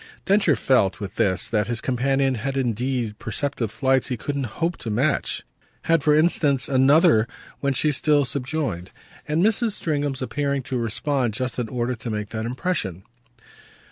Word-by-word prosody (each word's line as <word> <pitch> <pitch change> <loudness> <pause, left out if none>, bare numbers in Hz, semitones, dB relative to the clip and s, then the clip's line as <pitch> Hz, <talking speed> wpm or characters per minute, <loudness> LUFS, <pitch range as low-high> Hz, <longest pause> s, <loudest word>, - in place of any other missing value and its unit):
Densher 195 -6 +4
felt, 110 -8 +2
with 100 -2 -7
this, 95 -1 +1
that 105 -2 0
his 120 -1 -2
companion 135 +2 +1
had 135 +4 -3
indeed 120 -2 -1
perceptive 120 -1 -2
flights 130 +4 +1
he 125 - -2
couldn't 140 +3 -3
hope 170 +1 0
to 115 - -6
match 130 +7 0 0.4
had 165 -1 +3
for 150 +1 +4
instance 150 -5 +2
another 135 -2 +4 0.3
when 140 -1 0
she 150 +3 +2
still 145 0 +3
subjoined: 130 - -3 0.4
"And 155 +3 +1
Mrs. 220 0 +2
Stringham's 145 -7 -2
appearing 140 0 -1
to 130 - -3
respond 120 +1 -1
just 125 +1 -3
in 115 -3 -2
order 125 +1 -1
to 115 0 -6
make 105 -1 -3
that 110 0 -3
impression." 120 - -2
130 Hz, 160 wpm, -23 LUFS, 115-145 Hz, 0.4 s, Densher